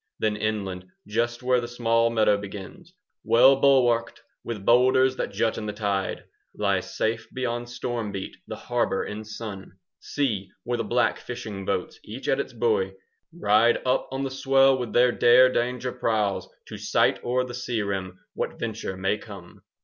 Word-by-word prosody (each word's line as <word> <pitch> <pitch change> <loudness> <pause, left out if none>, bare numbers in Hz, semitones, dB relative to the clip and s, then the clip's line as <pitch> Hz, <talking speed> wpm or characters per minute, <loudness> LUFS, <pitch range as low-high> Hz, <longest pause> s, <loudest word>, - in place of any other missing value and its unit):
Then 110 -1 0
inland 100 -4 -3 0.2
just 120 +3 -1
where 125 -1 +3
the 120 - -5
small 115 -1 +2
meadow 110 -3 +3
begins, 105 - -9 0.3
Well 125 +4 +6
bulwarked 130 -4 +3 0.2
with 105 -4 -6
boulders 130 +2 +4
that - - -2
jut 110 - 0
in 105 - -5
the 105 - -3
tide, 100 -2 -2 0.3
Lies - - -1
safe 110 0 -1
beyond 120 -2 -3
storm 120 -3 -4
beat 95 -1 -6
the - - -5
harbour 120 -5 -1
in 105 +1 -6
sun. 110 -2 -7
10 - - -16 0.3
See 105 -10 -2
where 120 -1 -2
the - - 0
black 105 - +1
fishing 100 -3 -7
boats, 435 - -2
each - - -8
at - - +2
its - - -3
buoy, 465 0 0 0.4
Ride 115 -7 +3
up 130 +1 +1
on 135 +1 -3
the 135 - -3
swell 135 0 +4
with 125 -4 -4
their 125 +3 +4
dare 125 +2 +6
danger 125 +1 -1
prows, 105 -5 -1 0.2
To - - -7
sight - - +1
o'er 125 +1 +1
the 125 -1 -7
sea 120 -3 -2
rim 95 -2 -4
what - - -4
venture 110 -4 -4
may 95 +3 0
come! 100 -6 -12
115 Hz, 170 wpm, -25 LUFS, 105-125 Hz, 0.4 s, Well